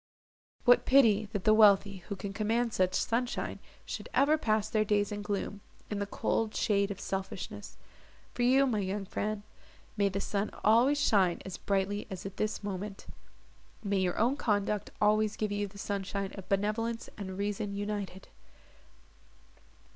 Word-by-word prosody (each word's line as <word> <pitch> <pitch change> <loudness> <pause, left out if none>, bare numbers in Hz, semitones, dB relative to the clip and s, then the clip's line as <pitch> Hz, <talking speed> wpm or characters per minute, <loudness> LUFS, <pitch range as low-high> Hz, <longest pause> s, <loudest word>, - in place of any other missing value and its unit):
"What 245 -1 +6
pity 220 -6 +5
that 205 -4 -3
the 215 - +5
wealthy, 200 -2 +5
who 200 - -2
can 195 +1 -6
command 225 +3 0
such 185 0 +1
sunshine, 240 +2 -1 0.3
should - - -6
ever 285 +3 +5
pass 215 -8 +1
their 215 -3 +1
days 205 -1 +1
in 205 0 -4
gloom—in 205 0 -5
the 200 - -2
cold 220 +2 -1
shade 200 -1 +2
of 200 -1 -5
selfishness! 190 -1 -5 0.6
For - - -4
you, 260 +3 +5
my 230 -5 0
young 195 +1 -2
friend, 210 +2 -3 0.5
may 200 -2 +2
the 195 +1 -3
sun 200 +1 -1
always 245 +7 +5
shine 195 -10 +3
as 190 - -6
brightly 200 +1 -1
as 185 -1 -7
at 195 0 -7
this 215 0 -2
moment; 200 0 -5 0.8
may 200 -1 0
your 180 -1 0
own 245 +6 +2
conduct 210 -3 0
always 215 0 +3
give 215 -1 -2
you 205 0 -1
the 200 +1 -14
sunshine 200 -1 -3
of 190 -2 -10
benevolence 220 +4 -1
and 190 -3 -6
reason 205 0 -2
united!" 205 -2 -4
205 Hz, 155 wpm, -31 LUFS, 195-215 Hz, 0.8 s, What